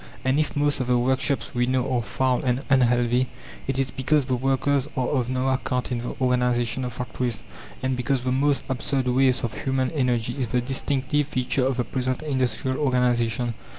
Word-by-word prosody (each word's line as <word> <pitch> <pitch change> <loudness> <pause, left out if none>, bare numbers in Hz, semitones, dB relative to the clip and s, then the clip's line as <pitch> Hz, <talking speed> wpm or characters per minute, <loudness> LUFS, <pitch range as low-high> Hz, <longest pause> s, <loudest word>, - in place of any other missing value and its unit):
And 130 +3 +2
if 155 - 0
most 145 -1 +1
of 130 - -2
the 125 -1 +3
workshops 130 +2 0
we 120 0 +1
know 130 0 +1
are 120 - +2
foul 125 +3 0
and 125 +1 0
unhealthy, 125 -1 +3 0.4
it 135 -1 -1
is 135 -1 0
because 140 +2 +1
the 130 -1 0
workers 135 +2 +1
are 130 -1 +1
of 125 -4 0
no 130 +1 0
account 125 -1 -1
in 120 - 0
the 120 - -5
organization 125 -1 +1
of 125 -1 -4
factories, 125 -2 -3 0.4
and 130 0 +1
because 125 +1 -1
the 130 - 0
most 140 +2 +2
absurd 130 0 -1
waste 130 0 +3
of 120 - -2
human 130 -1 0
energy 125 -4 0
is 125 - 0
the 125 +3 +1
distinctive 135 +3 0
feature 130 -1 0
of 135 -2 -1
the 125 - +1
present 130 +3 -2
industrial 130 -3 -1
organization. 120 -3 +1
130 Hz, 190 wpm, -24 LUFS, 125-135 Hz, 0.4 s, the